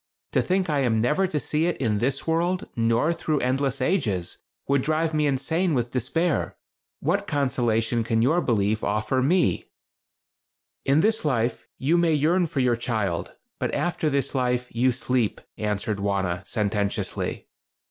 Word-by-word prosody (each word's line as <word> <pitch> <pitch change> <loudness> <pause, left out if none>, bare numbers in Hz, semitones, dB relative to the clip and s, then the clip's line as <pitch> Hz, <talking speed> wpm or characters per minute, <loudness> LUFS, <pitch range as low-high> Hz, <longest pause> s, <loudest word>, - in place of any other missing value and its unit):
To - - +3
think 185 0 0
I 150 -3 +1
am 120 -5 +2
never 150 +12 +2
to 155 -4 -1
see 155 +5 0
it 175 - -1
in 110 -5 0
this 130 +4 -1
world, 170 +3 0
nor 115 +7 +2
through 155 -3 -1
endless 135 +1 0
ages, 110 - 0 0.3
would 140 -1 +2
drive 155 +3 0
me 150 -1 +2
insane 160 +5 0
with 120 -1 -1
despair. 150 +7 -1 0.4
What - - 0
consolation 120 -4 +1
can 115 0 +1
your 160 +8 +3
belief 110 -4 +1
offer 110 +5 0
me?" 170 +7 +2 1.2
"In 140 +3 +4
this 220 +3 +1
life, 125 -5 0
you 160 +6 +2
may 170 -2 +3
yearn 170 +5 +2
for 140 -3 -1
your 125 -2 +3
child, 110 -8 -2 0.2
but - - -1
after 170 -3 0
this 140 -1 -1
life 125 -2 0
you 125 +3 +2
sleep," 125 -2 -1 0.2
answered 105 0 -2
Wauna, 95 -3 -1
sententiously. 105 -2 -2
130 Hz, 155 wpm, -25 LUFS, 115-155 Hz, 1.2 s, In